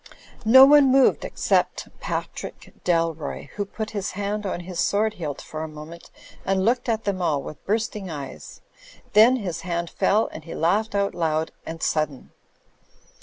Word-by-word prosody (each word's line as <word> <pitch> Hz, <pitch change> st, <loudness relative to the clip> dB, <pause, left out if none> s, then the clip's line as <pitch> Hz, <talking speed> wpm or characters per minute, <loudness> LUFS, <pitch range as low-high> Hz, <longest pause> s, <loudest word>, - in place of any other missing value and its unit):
No 260 Hz, +4 st, +9 dB
one 285 Hz, -1 st, +6 dB
moved 270 Hz, -1 st, +4 dB
except -, -, 0 dB
Patrick -, -, -6 dB
Dalroy, 165 Hz, -3 st, -1 dB
who 205 Hz, -, -4 dB
put 215 Hz, +2 st, -6 dB
his 205 Hz, -3 st, -3 dB
hand 205 Hz, +1 st, -3 dB
on 180 Hz, -, -3 dB
his 180 Hz, 0 st, -7 dB
sword 210 Hz, +1 st, +1 dB
hilt 150 Hz, -8 st, -5 dB
for 155 Hz, -, -7 dB
a 160 Hz, -, -3 dB
moment 155 Hz, +2 st, -11 dB, 0.3 s
and 190 Hz, 0 st, 0 dB
looked 245 Hz, +2 st, +1 dB
at 225 Hz, -1 st, 0 dB
them 195 Hz, -2 st, -2 dB
all 150 Hz, -5 st, 0 dB
with 155 Hz, -, -9 dB
bursting 215 Hz, -2 st, -1 dB
eyes; 140 Hz, -4 st, -8 dB, 0.5 s
then 225 Hz, +5 st, +7 dB
his 195 Hz, -9 st, -4 dB
hand 170 Hz, -1 st, -3 dB
fell 215 Hz, +3 st, +2 dB
and 155 Hz, -, -9 dB
he 165 Hz, -, -8 dB
laughed 205 Hz, +6 st, +1 dB
out 200 Hz, 0 st, +1 dB
loud 160 Hz, -1 st, -1 dB, 0.2 s
and 165 Hz, 0 st, -6 dB
sudden. 155 Hz, -4 st, -1 dB
190 Hz, 165 wpm, -24 LUFS, 160-215 Hz, 0.5 s, No